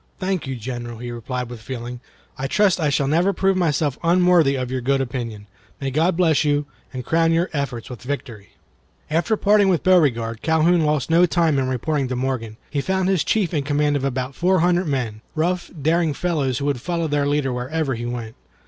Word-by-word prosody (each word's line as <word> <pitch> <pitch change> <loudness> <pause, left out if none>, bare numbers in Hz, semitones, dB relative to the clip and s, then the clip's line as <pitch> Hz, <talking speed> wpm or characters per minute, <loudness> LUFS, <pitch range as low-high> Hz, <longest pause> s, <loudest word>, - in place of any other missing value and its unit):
"Thank 185 -5 -2
you, 135 - -3
General," 120 0 -6
he 120 +1 -6
replied, 125 +1 -4
with 120 -2 -9
feeling. 120 0 -6 0.4
"I 135 - -3
trust 200 +4 +2
I 155 -3 +1
shall 140 0 +1
never 170 +7 +2
prove 195 +1 +1
myself 150 -6 0
unworthy 175 -4 +4
of 130 -1 -3
your 130 -1 -2
good 135 +2 +1
opinion. 120 -5 -4 0.3
May 135 -1 -3
God 165 +5 +1
bless 165 -4 +3
you, 145 -1 +1 0.3
and 130 -3 -6
crown 165 0 +2
your 170 +2 +1
efforts 130 -6 -3
with 125 - -9
victory!" 125 -6 -6 0.6
After 175 +8 +1
parting 205 -1 +4
with 175 -5 +1
Beauregard, 120 -11 +2
Calhoun 160 +1 +3
lost 150 -1 0
no 175 +2 +5
time 165 -4 +2
in 130 - 0
reporting 135 +2 -1
to 125 - -3
Morgan. 125 -4 -3
He 145 - 0
found 190 +3 0
his 190 -4 +2
chief 200 -6 0
in 150 - +1
command 145 +1 +1
of 140 - -1
about 130 0 -2
four 180 +3 +2
hundred 175 +1 +2
men, 120 -7 -2
rough, 175 +3 -1
daring 160 +1 +1
fellows 145 -8 -1
who 140 - -3
would 140 -4 -1
follow 170 0 -1
their 145 -1 0
leader 145 -3 0
wherever 135 +4 -2
he 120 0 -4
went. 120 -2 -5
145 Hz, 200 wpm, -22 LUFS, 125-170 Hz, 0.6 s, no